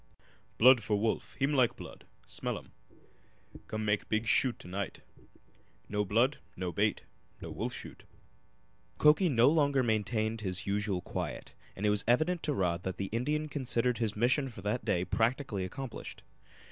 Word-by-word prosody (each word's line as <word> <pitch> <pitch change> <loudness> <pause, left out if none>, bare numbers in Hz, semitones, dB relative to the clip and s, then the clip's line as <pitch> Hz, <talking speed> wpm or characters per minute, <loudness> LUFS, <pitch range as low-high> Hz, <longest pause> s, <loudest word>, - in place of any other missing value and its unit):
"Blood 125 0 +7
for 105 0 0
wolf. 110 +1 -1
Heem 135 +2 +1
like 130 -4 +3
blood. - - -11 0.2
Smell - - -3
um - - -12 1.0
come 110 0 -3
make 105 -1 0
big 110 +1 0
shoot 130 +2 +2
to - - -12
night. 100 +2 -4 0.9
No 105 0 0
blood, 115 +8 +2 0.2
no 90 -1 -3
bait - - 0 0.4
no - - -7
wolf - - -3
shoot!" - - -10 0.9
Mukoki 155 +5 +5
no 120 -3 +5
longer 140 -3 +3
maintained 110 0 0
his 90 -3 -2
usual 100 -2 -1
quiet, - - -5 0.2
and 100 - -3
it 105 - +4
was 105 - +1
evident 155 +8 +2
to 150 - 0
Rod 90 -4 0
that 95 0 -4
the 95 -1 -3
Indian 150 +7 -1
considered 125 -4 -1
his 110 -3 0
mission 130 +5 +2
for 115 - -11
that 105 +4 -1
day 90 0 0
practically 115 0 0
accomplished. 125 +7 -7
115 Hz, 160 wpm, -31 LUFS, 105-130 Hz, 1.0 s, Blood